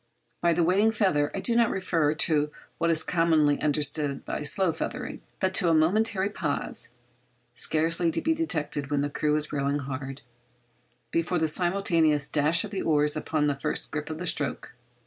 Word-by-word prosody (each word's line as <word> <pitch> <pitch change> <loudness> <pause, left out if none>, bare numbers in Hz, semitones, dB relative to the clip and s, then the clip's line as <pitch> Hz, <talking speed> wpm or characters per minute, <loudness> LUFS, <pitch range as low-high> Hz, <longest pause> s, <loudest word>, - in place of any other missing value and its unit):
By 170 -1 +3
the 170 +1 +1
'waiting 195 +6 +3
feather' 190 -10 +1
I - - -3
do 235 - 0
not 235 -1 +4
refer 165 -5 0
to 150 -1 +1 0.3
what 170 - +1
is 160 -1 +2
commonly 160 -4 +2
understood 145 -1 0
by - - -4
slow 170 +4 +2
feathering, 250 +10 -5 0.2
but 190 0 0
to 180 -2 +2
a 165 - +3
momentary 190 +5 +2
pause - - -2 0.6
(scarcely 165 +2 +1
to - - -1
be 320 - +1
detected 150 - -2
when 145 -1 0
the 145 0 -2
crew 150 +1 0
is 150 0 -2
rowing 140 0 0
hard) 135 0 -6 0.9
before 165 +2 0
the 160 -1 +1
simultaneous 165 -4 +2
dash 155 +3 +2
of 210 - -7
the 195 - -3
oars 150 -1 +2
upon 155 0 -1
the 145 - +1
first 145 +2 -1
grip 150 -1 -4
of 155 - -5
the 180 - -5
stroke. 145 -5 -1
160 Hz, 180 wpm, -26 LUFS, 150-180 Hz, 0.9 s, not